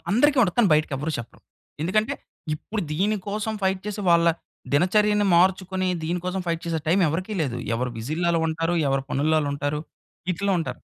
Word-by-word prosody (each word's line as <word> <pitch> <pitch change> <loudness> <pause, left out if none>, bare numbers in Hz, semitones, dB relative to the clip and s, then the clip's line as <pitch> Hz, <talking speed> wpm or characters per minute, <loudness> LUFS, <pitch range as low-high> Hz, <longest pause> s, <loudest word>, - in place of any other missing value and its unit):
అందరికి 275 +6 +4
ఉంటది 180 -5 +1
కానీ, 215 -5 +5
బయటకి 150 -1 +1
ఎవర్రు 155 +4 -3
చెప్పరు. 115 - -9 0.4
ఎందుకంటే 215 +6 +1 0.4
ఇప్పుడు 205 +6 -4
దీని 205 +7 +1
కోసం 215 +2 -2
ఫైట్ 190 0 +1
చేసి, 210 0 -4
వాళ్ళ 170 0 +5 0.5
దినచర్యని 210 +6 +3
మార్చుకుని, 185 +1 +2 0.2
దీని 175 +2 -1
కోసం 185 +1 -2
ఫైట్ 165 -1 -1
చేసే 165 -1 0
టైమ్ 180 +4 +3
ఎవరికీ 185 +7 -3
లేదు. 130 -5 -1 0.2
ఎవరు 125 +1 -1
బిజీల్లో 155 +9 -2
ఆ‌ళ్ళు 165 -1 +2
ఉంటారు. 165 +2 -1
ఎవరు 135 0 +1
పనుల్లో 155 +3 +2
ఆ‌ళ్ళుం‌టారు. 145 +1 -2 0.5
ఇట్లా 200 +4 -1
ఉంటారు. 165 - -4
175 Hz, 170 wpm, -24 LUFS, 155-200 Hz, 0.5 s, కానీ